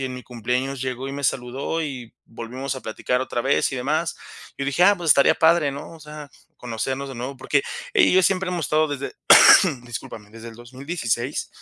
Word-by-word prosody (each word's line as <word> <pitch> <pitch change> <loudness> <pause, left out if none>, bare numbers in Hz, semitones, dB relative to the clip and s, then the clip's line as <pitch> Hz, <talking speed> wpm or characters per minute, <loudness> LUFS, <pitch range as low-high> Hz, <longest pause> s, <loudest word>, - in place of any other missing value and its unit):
y - - -3
en 130 - -4
mi 125 - -10
cumpleaños 125 +3 -3
llegó 130 0 -4
y 135 - -6
me 140 - -6
saludó, 135 +5 -2
y 130 -7 -6
volvimos 125 +4 -6
a 130 - -7
platicar 125 +3 -2
otra 130 -2 -3
vez, 135 +3 +1
y - - -3
demás, 150 +6 -2 0.4
y 140 - -4
dije: 140 +5 0
"Ah, 200 +2 +5
pues 170 -3 -1
estaría 140 - +5
padre", 160 -2 +3
¿no? 140 +3 -9
O 165 - -14
sea, 150 -1 -10 0.3
conocernos 130 +3 -4
de 135 - -8
nuevo, 125 +3 -6
porque 135 +2 0 0.3
ella 400 -5 +5
y - - +1
yo 185 - +5
siempre 190 -1 +1
hemos 175 -3 -2
estado 155 0 +1
desde, 140 -1 -5 0.7
discúlpame, 115 -3 -8
desde 115 +1 -11
el 115 - -12
2016. 130 0 -4
135 Hz, 205 wpm, -22 LUFS, 125-150 Hz, 0.7 s, Ah